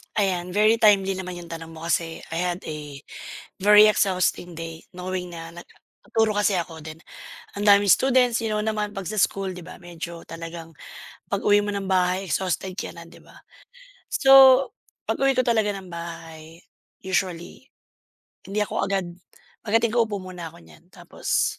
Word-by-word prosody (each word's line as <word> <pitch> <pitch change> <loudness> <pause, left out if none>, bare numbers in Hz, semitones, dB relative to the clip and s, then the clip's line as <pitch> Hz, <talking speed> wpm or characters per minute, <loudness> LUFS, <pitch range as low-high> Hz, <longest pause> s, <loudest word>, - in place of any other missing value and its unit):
Ayan, 180 -3 -1
very 215 +2 +4
timely 195 -3 +4
naman 185 -1 -5
'yong 175 -1 -10
tanong 165 -1 -8
mo 160 - -11
kasi 165 -1 -1
I 165 - -3
had 180 0 -2
a 150 -2 -8 0.6
very 210 +2 +7
exhausting 185 -3 0
day 165 0 -8
knowing 180 -1 -5
na 165 0 -8
nagtuturo 205 +5 -3
kasi 205 -1 +2
ako 170 -2 -5
then 155 +2 -10 0.6
ang - - -3
daming 205 0 +6
students 250 0 +4
you 225 - -2
know 215 - -1
naman 210 -1 -2
'pag 195 -1 -6
sa 215 +4 -4
school 195 -1 0
'di 180 - -9
ba, 175 - -11
medyo 170 -1 -9
talagang 165 0 -9 0.5
pag-uwi 205 +1 +2
mo 205 0 -3
ng 195 -1 -4
bahay 185 +1 +1
exhausted 185 +3 -2
ka - - -4
na, 170 - -10
'di - - -16
ba? - - -19 0.8
So, 270 -1 +7 0.4
pag-uwi 270 0 +2
ko - - +4
talaga 220 -3 +2
ng 190 -1 -10
bahay 165 -1 -9 0.4
usually, 185 +2 -3 0.8
hindi 200 +2 -3
ako - - -2
agad 195 -2 -1 0.6
pagdating 225 +1 +2
ko 235 - +5
upo 205 -2 -4
muna 180 -3 -8
ko - - -16
niyan 80 -2 -19
tapos, - - -2
185 Hz, 165 wpm, -24 LUFS, 170-210 Hz, 0.8 s, very